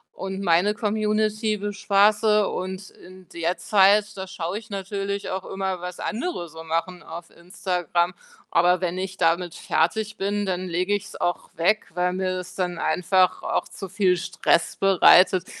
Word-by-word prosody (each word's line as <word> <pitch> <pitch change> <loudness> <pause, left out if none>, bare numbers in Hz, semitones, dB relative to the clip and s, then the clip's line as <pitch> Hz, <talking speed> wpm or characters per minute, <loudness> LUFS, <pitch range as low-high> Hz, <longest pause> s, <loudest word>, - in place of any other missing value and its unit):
und 195 0 -5
meine 180 +4 +3
Community 215 0 0
bespaße 205 +1 +2
und 185 +1 -5
in 185 0 -16
der 170 +2 -1
Zeit, 210 +1 +3
da 190 -1 -6
schaue 185 +1 -4
ich 225 0 -17
natürlich, 200 0 -4
auch 190 0 -3
immer 190 -2 -4
was 180 0 -7
andere 225 - -3
so 160 +1 -10
machen, 165 +2 -3
auf 165 +1 -10
Instagram. 175 -1 -2 0.4
Aber 180 +1 +4
wenn 180 0 -2
ich 185 0 -5
damit 170 +1 +1
fertig 215 +6 0
bin, 205 +1 -1
dann 185 -1 -2
lege 180 +3 -1
ich's 205 -1 -4
auch 175 - -2
weg, 180 +7 +1
weil 180 0 0
mir's 185 -1 -3
dann 180 -2 -2
einfach 185 +2 +2
auch - - -1
zu 195 - -9
viel 185 -1 +2
Stress 170 -1 0
bereitet, 185 -1 +5
185 Hz, 155 wpm, -24 LUFS, 180-205 Hz, 0.4 s, bereitet